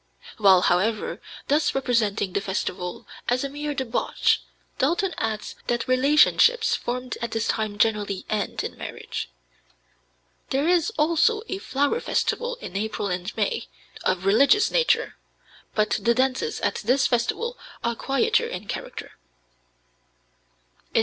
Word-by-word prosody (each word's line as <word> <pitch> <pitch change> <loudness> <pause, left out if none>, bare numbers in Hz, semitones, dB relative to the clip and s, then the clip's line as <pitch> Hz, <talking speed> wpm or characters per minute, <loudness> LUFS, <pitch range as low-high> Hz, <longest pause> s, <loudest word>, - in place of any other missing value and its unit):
While, 190 -3 +6
however, 205 +6 +1 0.3
thus 295 +2 +2
representing 220 -7 0
the 200 - 0
festival 185 -2 -4 0.2
as 250 +2 +1
a 275 - -2
mere 295 +1 -4
debauch, 255 -3 +1 0.4
Dalton 350 +7 +1
adds 220 -1 -3
that 240 +1 -1
relationships 300 - +4
formed 250 0 -3
at 235 - -2
this 225 0 -1
time 215 -2 -1
generally 205 -3 0
end 210 -1 -2
in - - -5
marriage. - - -6 1.2
There 275 +4 +1
is 350 0 +3
also 335 +8 +3
a 385 - -3
flower 285 - 0
festival 485 +1 -1
in 180 - -8
April 210 0 -2
and 180 +3 -3
May, 470 -2 -1 0.4
of 185 0 0
religious 275 - +5
nature, 480 -1 +2 0.6
but 215 0 +1
the 235 +3 +3
dances 265 - 0
at - - 0
this 255 +4 +2
festival 260 - 0 0.3
are 235 - +1
quieter 440 - +1
in 470 - -6
character. - - -7
250 Hz, 130 wpm, -24 LUFS, 210-310 Hz, 1.2 s, While